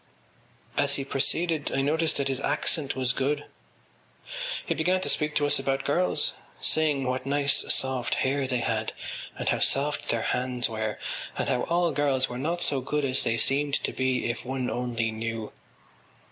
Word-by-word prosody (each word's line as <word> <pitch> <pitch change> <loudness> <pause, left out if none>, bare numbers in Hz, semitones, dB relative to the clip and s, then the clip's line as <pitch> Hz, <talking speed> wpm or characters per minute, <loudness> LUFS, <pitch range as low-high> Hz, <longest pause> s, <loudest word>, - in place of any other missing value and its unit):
As 140 0 +4
he 135 - -3
proceeded 155 +3 +1
I 135 - +1
noticed 160 +2 +1
that 140 - +1
his 135 -1 0
accent 145 0 +1
was 130 -1 0
good. 140 +3 -1 1.2
He - - 0
began 180 +4 +2
to - - -1
speak 150 -1 +1
to 145 - +3
us 145 - +3
about 135 0 -1
girls, 175 +6 +2 0.3
saying 150 -3 +2
what 130 +1 -2
nice 140 0 +2
soft 130 -2 0
hair 135 0 0
they 125 -2 0
had 110 -1 -1 0.4
and - - -1
how - - +1
soft 145 +2 +1
their 115 - +1
hands 125 -1 0
were 110 -2 -3 0.4
and - - -1
how 125 - +1
all 170 0 +2
girls 140 -2 +1
were 125 - -6
not 170 +5 0
so 135 -2 +2
good 150 +2 -1
as 130 0 +1
they 115 0 0
seemed 140 +4 +2
to - - -1
be 130 -1 0
if 120 - -3
one 130 0 -2
only 120 -2 -1
knew. 115 0 -4
135 Hz, 175 wpm, -27 LUFS, 125-145 Hz, 1.2 s, As